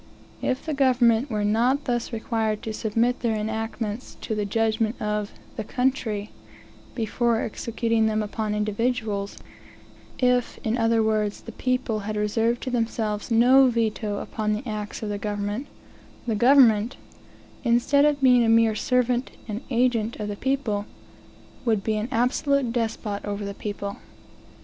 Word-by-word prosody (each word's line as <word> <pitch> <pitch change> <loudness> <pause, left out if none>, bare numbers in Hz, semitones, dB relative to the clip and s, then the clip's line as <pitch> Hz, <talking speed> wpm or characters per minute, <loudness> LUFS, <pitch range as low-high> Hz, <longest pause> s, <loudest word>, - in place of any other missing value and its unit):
If 260 0 -1
the 315 - -2
government 255 -2 +3
were 210 -3 -1
not 245 +7 +2
thus 240 -1 -1
required 220 -2 -1
to 220 - -4
submit 230 +3 0
their 230 -2 0
enactments 220 +1 -4
to 220 - -3
the 210 -1 -1
judgment 220 +2 0
of 210 -1 -2 0.3
"the 220 - -2
country," 230 -4 -1 0.6
before 230 0 +1
executing 230 0 0
them 215 0 0
upon 210 0 -3
individuals 210 -1 -1 0.8
if, 250 -1 +1
in 220 +1 0
other 225 -1 +2
words, 215 -1 0
the 230 - -9
people 255 -2 -1
had 210 +1 -4
reserved 225 +3 0
to 255 - -3
themselves 225 -3 -1
no 250 +4 +6
veto 220 -3 -1
upon 215 0 -2
the 215 +5 -4
acts 210 0 -5
of 215 - -3
the 205 -1 -3
government, 205 +5 -3 0.6
the 230 - 0
government, 235 -1 +5 0.7
instead 245 +4 +3
of 295 -1 +2
being 250 -2 +6
a 225 - +2
mere 225 -1 +5
servant 250 +2 +1 0.2
and 215 +1 -4
agent 235 -3 +1
of 210 -1 -4
the 205 - -3
people, 240 -5 -1 0.8
would 220 -5 +1
be 220 - 0
an 215 +3 -2
absolute 255 +1 +1
despot 220 -3 -2
over 205 0 -4
the 200 - -4
people. 200 -1 -5
225 Hz, 150 wpm, -25 LUFS, 210-245 Hz, 0.8 s, no